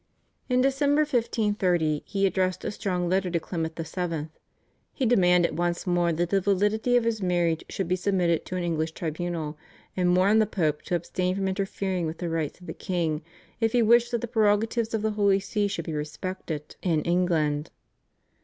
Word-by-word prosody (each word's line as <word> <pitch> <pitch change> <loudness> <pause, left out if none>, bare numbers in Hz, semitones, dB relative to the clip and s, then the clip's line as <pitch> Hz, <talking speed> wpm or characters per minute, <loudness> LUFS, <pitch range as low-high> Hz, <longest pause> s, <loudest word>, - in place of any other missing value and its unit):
In 250 0 +3
December 280 +2 +3
1530 205 - +1
he 195 0 +1
addressed 185 -1 0
a - - -1
strong 180 -4 -2
letter 185 +1 +1
to 170 -1 0
Clement 160 -1 -4
VII. 165 -2 -3 0.6
He 265 - -1
demanded 180 -8 +4
once 175 0 -1
more 175 -1 +2
that 170 +1 -1
the 195 -1 +3
validity 210 +5 +2
of 240 - +2
his 230 -2 -1
marriage 175 -3 +1
should 195 - -3
be 180 - +2
submitted 180 -3 +1
to 185 - -4
an 180 - -1
English 160 -1 -1
tribunal, 160 -2 -4 0.4
and 180 -1 +2
warned 205 +4 +5
the 215 - +2
Pope 155 -7 0
to 180 - 0
abstain 180 +2 -1
from 195 0 -1
interfering 190 -2 -2
with 160 - -5
the 175 - -3
rights 160 -1 -2
of 180 - -14
the - - -5
king, 165 -4 -2 0.4
if 225 -1 +1
he 240 -1 +4
wished 235 +2 +5
that 235 -2 -1
the 240 - -3
prerogatives 225 +1 +1
of 215 - -2
the 220 - +1
Holy 200 -2 +3
See 205 +1 -1
should 170 -5 -4
be 160 - -4
respected 150 +1 -5
in 165 -4 +1
England. 165 -4 +1
185 Hz, 185 wpm, -26 LUFS, 170-210 Hz, 0.6 s, warned